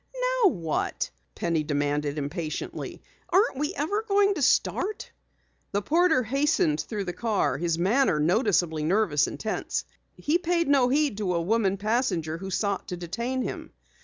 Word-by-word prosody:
"Now 405 - +8
what?" 165 - -2 0.2
Penny 170 -2 0
demanded 145 0 -1
impatiently. 155 +2 -5 0.3
"Aren't 380 - +3
we 300 +6 -1
ever 405 +9 -1
going 405 -2 +3
to 325 - -4
start?" 385 +9 +1 0.6
The 200 +1 0
porter 325 - +3
hastened 275 - +1
through 210 -3 -4
the 175 -2 -4
car, 210 - 0
his 170 -1 0
manner 195 - +2
noticeably 175 - +2
nervous 170 -3 +2
and - - -7
tense. 215 - -2 0.3
He 315 +4 +1
paid 340 -2 0
no 270 -3 +4
heed 285 -5 +1
to 185 -4 0
a 170 - +1
woman 200 0 +1
passenger 195 -7 -1
who 190 +1 -6
sought 200 +1 -1
to 180 - -4
detain 235 +9 -3
him. - - -6
210 Hz, 155 wpm, -26 LUFS, -, 0.6 s, Now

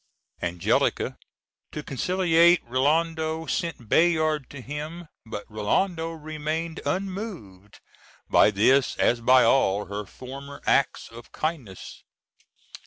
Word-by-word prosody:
Angelica, 85 0 0 0.6
to 150 - -6
conciliate 170 +4 +3
Rinaldo, 160 +5 0
sent 165 - -3
Bayard 155 -2 +2
to 140 - -9
him; 150 +6 -7 0.2
but 110 -2 -6
Rinaldo 160 - -1
remained 155 +1 -4
unmoved 185 - -5 0.5
by - - +5
this 120 +6 +3
as 120 0 +2
by 130 +2 +6
all 105 -6 +3
her 100 0 -6
former 140 +5 -9
acts 140 - +1
of 115 +1 -13
kindness. 145 - -5
150 Hz, 105 wpm, -25 LUFS, 120-165 Hz, 0.6 s, by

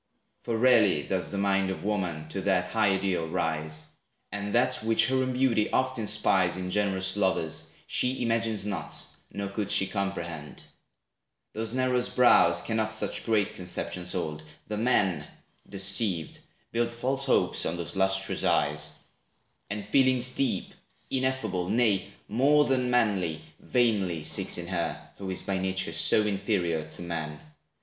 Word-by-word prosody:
For 115 -2 -2
rarely 110 - +4
does 95 +3 -2
the 100 - -3
mind 100 -1 +1
Of 95 - -5
woman 90 -7 -2
to 95 - -3
that 95 -2 +1
high 110 -3 +3
ideal 95 -4 -1
rise; 80 -1 -3 0.5
And 100 0 -4
that 120 - +2
which 110 0 +3
her 130 - +2
own 130 0 0
beauty 125 -4 +2
oft 130 -1 0
inspires 100 -4 +2
In 90 0 -4
generous 95 -2 0
lovers, 95 -5 -1 0.2
she 125 0 -1
imagines 115 -2 0
not, 95 -7 -1 0.3
Nor 100 -1 -4
could 100 0 -3
she 95 - +3
comprehend. 85 -7 -4 0.9
Those 110 +2 -2
narrow 130 -1 +1
brows, 85 -9 +5
Cannot 110 -1 -1
such 110 +2 -2
great 110 -3 +1
conceptions 90 0 -3
hold. 75 -1 -3 0.3
The 105 - -4
man, 95 -9 +1 0.4
Deceived, 95 -3 0 0.3
builds 115 0 0
false 135 +3 0
hopes - - +2
on 85 - -2
those 85 +1 -3
lustrous 95 0 +1
eyes, - - 0 0.8
And 105 0 -4
feelings 130 +2 +3
deep, 130 -8 -1 0.4
ineffable, 130 -9 -1
nay, 105 -3 +1 0.2
more 145 +6 +3
Than 130 -2 +1
manly, 95 -10 +1 0.2
vainly 100 -10 +1
seeks - - +2
in 85 - -4
her, 85 -3 -2 0.2
who 95 -1 -5
is 95 - -3
By 95 -1 -1
nature 95 -2 -2
so 105 +6 +4
inferior 95 -6 -1
to 80 +2 -2
man. 80 -3 -5
100 Hz, 145 wpm, -27 LUFS, 90-115 Hz, 0.9 s, brows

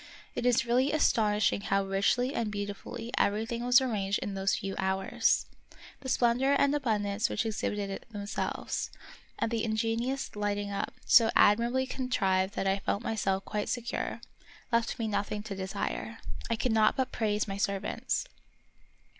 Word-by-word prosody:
It 245 - -1
is 240 -1 +3
really 250 +4 +2
aston 220 -8 +3
ishing 205 -1 +2
how 195 0 +1
richly 200 +7 +1
and 225 -2 -1
beautifully 205 +3 -5
everything 225 +3 0
was 245 +1 +6
arranged 210 -6 0
in 200 - -4
those 195 0 +1
few 195 -2 -4
hours. 190 0 +1 0.5
The 265 - -6
splendor 250 +2 +3
and 280 0 +3
abundance 215 -6 0
which 215 - -1
exhibited 205 -2 -3
themselves, 205 -1 -3 0.5
and 225 - -1
the 225 -1 0
ingenious 230 +4 -1
lighting 205 -1 -1
up, 200 0 -3
so 230 -2 +7
admirably 235 +5 +4
contrived 200 -8 0
that - - -1
I 195 +1 +2
felt 200 +2 -1
myself 195 -4 -1
quite 210 -1 -2
secure, 240 -1 -3 0.5
left 230 +1 +1
me 225 -3 -1
nothing 205 0 -2
to 210 -2 -5
desire. 200 +3 -4 0.3
I 230 - +2
could 245 +2 0
not 220 -1 +4
but 260 -1 0
praise 210 -2 0
my 195 -1 -4
servants. 200 0 -1
215 Hz, 155 wpm, -30 LUFS, 200-235 Hz, 0.5 s, so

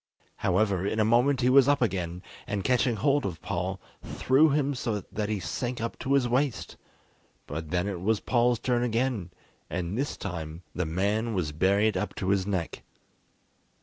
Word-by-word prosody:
However, 95 0 +1
in 110 - -1
a 110 - +4
moment 125 +4 +3
he 125 - +3
was 135 0 +6
up 145 0 +4
again, 90 -6 -2 0.2
and 100 -2 -2
catching 125 0 +2
hold 140 +6 +2
of 90 -5 -4
Paul, - - -2 0.2
threw 140 +5 +3
him 145 0 +1
so 115 -5 -2
that 105 0 -2
he 105 -2 -1
sank 120 +8 -3
up 115 +1 -4
to 135 - -1
his 135 -3 +3
waist; 130 +2 -1 0.7
but 80 +1 -6
then 90 +3 0
it 95 -4 -4
was 110 +2 +1
Paul's 120 0 +2
turn 120 +1 0
again, 120 -5 0 0.4
and 85 +2 -3
this 140 +4 -2
time 80 -3 -6
the 90 -2 -2
man 105 +7 0
was 85 -5 -1
buried 100 +7 +2
up 105 - -3
to 95 - -2
his 100 -1 +1
neck. 95 -5 -2
110 Hz, 180 wpm, -28 LUFS, 95-125 Hz, 0.7 s, was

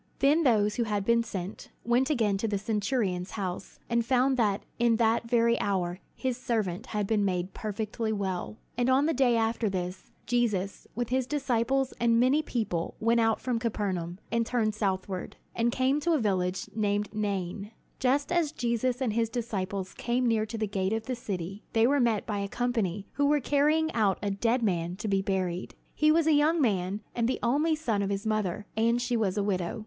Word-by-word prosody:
'" - - -38
Then 290 +4 +4
those 210 -7 +3
who 235 - +1
had 205 -2 -1
been 235 +1 +4
sent, 200 -4 -6 0.2
went 245 +4 +2
again 225 -9 +2
to 225 - 0
the 205 -2 0
centurion's 205 -3 -1
house, 185 -2 -4
and 235 0 +1
found 260 +2 +2
that 210 -5 +1 0.2
in 235 -1 +4
that 230 0 +1
very 235 -1 +3
hour 180 -3 -1 0.2
his 255 -2 -2
servant 215 -8 -2
had 210 -1 -1
been 210 0 +1
made 185 -1 -1
perfectly 220 +1 -3
well. 190 - -3 0.2
On 260 +3 +3
the 325 - +2
day 245 -3 +3
after 225 -1 +1
this, 180 -1 -5
Jesus 210 -6 -1
with 240 0 -2
his 255 0 0
disciples 270 -2 0
and 230 -1 +3
many 260 +5 +4
people 215 - -2
went 230 +1 +3
out 225 -1 +2
from 245 -3 -1
Capernaum, 190 -7 -2
and 230 0 +2
turned 225 -2 0
southward, 190 -3 -2 0.2
and 235 +1 +2
came 260 +4 +2
to 335 +3 +1
a - - +4
village 185 -5 0
called 205 -1 0
Nain. 200 -1 -2 0.3
Just 280 +4 +1
as 340 -4 +2
Jesus 240 +2 -1
and 230 -4 0
his 230 0 +1
disciples 200 -5 -3
came 245 +1 -1
near 220 -2 +1
to 225 - -5
the 220 - 0
gate 195 0 -1
of 225 0 -2
the 255 - -2
city, 195 -3 -5
they 225 0 +4
were 280 +3 +3
met 230 -4 +2
by 205 -2 -2
a 200 - -2
company 210 -5 -1
who 285 0 +1
were 295 +1 +3
carrying 300 +4 +2
out 205 -4 +2
a 200 - 0
dead 230 +5 +1
man 175 -4 0
to 210 +3 -5
be 195 -1 +2
buried. 185 -2 -2 0.2
He 305 0 +4
was 325 0 +3
a 315 - +4
young 305 +3 +3
man, 200 -5 0
and 235 -1 0
the 260 - 0
only 295 +7 +2
son 230 -10 -1
of 200 - -1
his 200 +2 -2
mother, 210 -2 -1
and 230 +2 +2
she 245 0 -1
was 210 -4 0
a 205 - +1
widow. 185 0 -1
225 Hz, 200 wpm, -28 LUFS, 200-245 Hz, 0.3 s, Then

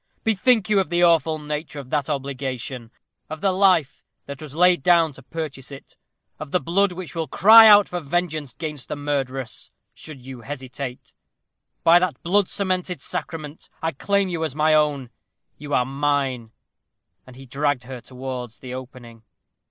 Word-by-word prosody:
Bethink 220 -1 +2
you 210 -2 +3
of 190 - -1
the 175 +1 +1
awful 165 -2 +3
nature 150 0 -5
of 130 -2 -11
that 150 -1 -1
obligation; 130 -3 -4 0.4
of 155 0 -6
the 195 +2 +1
life 185 -6 +2 0.2
that 140 0 -8
was 150 -2 -9
laid 180 -1 +4
down 165 0 +4
to - - -14
purchase 150 -5 -7
it; 140 - -12 0.4
of 155 -1 -7
the 180 - +1
blood 195 +4 +1
which 175 -4 -8
will 165 -2 -3
cry 220 +3 +8
out 205 -1 +7
for 180 - -4
vengeance 155 -3 -3
'gainst 150 -5 -5
the - - -4
murderess, 135 -4 -3 0.2
should 155 -4 -11
you 130 -2 -9
hesitate. 130 0 -7 0.7
By 170 +1 +7
that 180 -7 -2
blood 195 +2 +2
cemented 185 -3 -2
sacrament, 155 +2 -6
I 160 - -1
claim 200 +7 0
you 170 -3 -3
as 155 -4 -3
my 155 +1 +3
own. 145 -5 +1 0.5
You 145 0 -9
are 125 - +2
mine." 135 -4 -1 0.8
And 130 - -13
he 135 +1 -12
dragged 140 0 -1
her 125 -1 -8
towards 125 -3 -7
the 125 +2 -9
opening. 125 -3 -10
150 Hz, 165 wpm, -23 LUFS, 135-175 Hz, 0.8 s, cry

